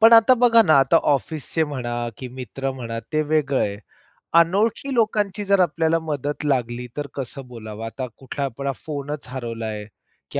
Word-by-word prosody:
पण 225 +1 +8
आता 230 +2 +8
बघा 230 -2 +6
ना, 155 -8 +5
आता 135 +5 +5 0.2
ऑफिसचे 155 +3 -1
म्हणा 130 -5 -4 0.2
की 130 - -6
मित्र 130 +2 -4
म्हणा, 115 -3 -5
ते 155 0 +2
वेगळं 150 -3 +1
आहे. 100 0 0 0.6
अनोळखी 210 +10 +2
लोकांची 210 -3 +1
जर 200 -1 +3
आपल्याला 165 -1 +2
मदत 150 -2 -3
लागली, 125 -3 0
तर 145 -1 -2
कसं 135 0 -6
बोलावं? 110 -2 -8
आता 125 +3 -4
कुठला 140 +1 -4
आपला 140 +2 -3
फोनच 145 -1 -5
हरवलाय 115 -4 -5 0.5
की - - -1
140 Hz, 160 wpm, -23 LUFS, 125-165 Hz, 0.6 s, पण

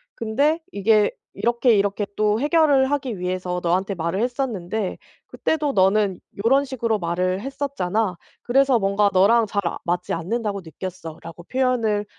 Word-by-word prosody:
근데 280 +9 +1
이게 210 +1 +3 0.2
이렇게 235 0 +2
이렇게 200 +1 0
또 215 0 +2
해결을 290 -3 +3
하기 270 -7 -2
위해서 180 0 -2
너한테 185 +3 0
말을 170 +3 -2
했었는데 220 -6 -2 0.3
그때도 300 -2 -1
너는 195 -1 +2 0.3
요런 270 +4 +4
식으로 230 -5 -1
말을 180 +2 -1
했었잖아. 225 -8 -2 0.3
그래서 265 0 +3
뭔가 200 +1 +2
너랑 215 +5 +5
잘 200 0 -1
아 - - -3
맞지 175 +1 -2
않는다고 200 +3 -2
느꼈어."라고 170 -1 -8
표현을 230 -3 0
210 Hz, 330 characters per minute, -22 LUFS, 185-250 Hz, 0.3 s, 너랑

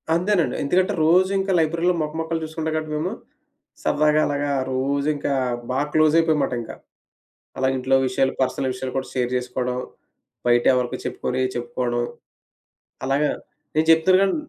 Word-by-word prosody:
అంతేనండి. 170 -6 +1
ఎందుకంటే, 185 +7 +2
రోజు 180 +4 +4
ఇంకా 195 0 -1
లైబ్రరీ‌లో 170 +3 +1
మొక, 150 0 -3
మొకాలు 165 0 -2
చూసుకుంటాం 160 0 -3
కాబట్టి 155 -1 -3
మేము 170 +5 -2 0.7
సరదాగా 150 +1 +3
అలాగా 145 0 -1 0.2
రోజు 140 +2 0
ఇంకా 145 - -2 0.4
బాగా 135 +3 0
క్లోజ్ 155 -1 +4
అయిపోయాం 165 -1 +3
అన్నమాట 130 - 0
ఇంకా. 115 - -8 0.8
అలాగే 130 0 +1
ఇంట్లో 130 +1 +2
విషయాలు 130 +1 +1
పర్సనల్ 130 0 0
విషయాలు 130 0 -5
కూడా 130 - -2
షేర్ 125 -2 0
చేసుకోవడం, 125 0 -2 0.7
బయట 120 0 +4
ఎవరికి 125 0 -1
చెప్పుకునే 130 +1 -2
చెప్పుకోవడం. 120 0 -2 1.0
అలాగా 140 +3 +1 0.5
నేను 155 +1 +3
చెప్తున్నాను 185 +4 +5
గాని 195 - +1
145 Hz, 145 wpm, -23 LUFS, 130-160 Hz, 1.0 s, చెప్తున్నాను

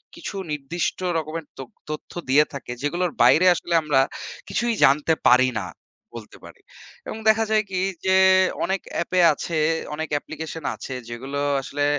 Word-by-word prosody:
কিছু - - -7 0.2
নির্দিষ্ট 150 +4 -3 0.2
রকমের 160 0 -4
ত্যথ 135 -3 -9 0.2
তথ্য 155 0 -6 0.2
দিয়ে 145 +3 +5
থাকে 140 -3 -7
যেগুলোর 175 +4 -1
বাইরে 170 +4 +5
আসলে 175 - -4
আমরা 145 -3 +3 0.5
কিছুই 240 -1 0
জানতে 145 +4 +3
পারি 130 +1 +5
না। 95 - -5 0.5
বলতে 115 -3 -10
পারি - - -14 0.5
এবং - - -5
দেখা 225 +1 +3
যায় 215 0 +3
কি 185 - -1 0.3
যে 190 0 +3 0.5
অনেক 190 0 -1
এ্যাপে 180 +2 0
আছে 160 +3 -4 0.4
অনেক 160 +1 -4
অ্যাপ্লিকেশন 160 +2 -5
আছে 130 - -7 0.2
যেগুলো 135 +4 -5 0.2
আসলে 145 +2 -2
155 Hz, 150 wpm, -23 LUFS, 140-175 Hz, 0.5 s, দিয়ে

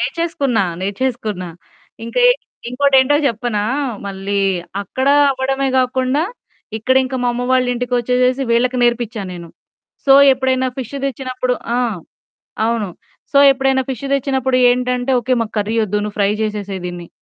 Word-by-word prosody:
నేర్చేసుకున్నా, 285 -10 0 0.2
నేర్చేసుకున్నా. 210 -3 -3 0.6
ఇంకఏట్ - - +3 0.3
ఇంకోటేంటో 270 +1 +3
జెప్పనా! 230 -3 -1 0.4
మళ్ళీ 200 +1 -3 0.4
అక్కడా 265 +7 +1 0.2
అవ్వడమే 270 +1 -1
గాకుండా 255 +3 +1 0.6
ఇక్కడింక 260 +3 +1
మా 245 - +2
అమ్మ 245 +1 -3
వాళ్ళింటికొచ్చేసేసి 250 +1 +1
వీళ్ళకి 245 +2 +2
నేర్పించాను 230 -5 -1
నేను. 170 -1 -9 0.6
సో, 270 - +7 0.2
ఎప్పుడైనా 260 0 0
ఫిష్ 260 +2 -6
తెచ్చినప్పుడు. 255 -2 -2 0.2
ఆ! - - +1 0.9
అవును. 230 -4 -1 0.4
సో, - - +4
ఎప్పుడైనా 270 0 +1
ఫిష్ 260 +1 -6
దెచ్చినప్పుడు 265 -1 0
ఏంటంటే, 250 +1 0
ఓకే 255 +2 +1
మాకు 225 -1 -5
కర్రీ 210 +2 -2
వద్దు 210 0 -1
నువ్వు 210 0 -7
ఫ్రై 200 0 +3
జేసేసేయి 205 -3 -4
దీన్ని. 175 -1 -7
250 Hz, 120 wpm, -18 LUFS, 215-265 Hz, 0.9 s, సో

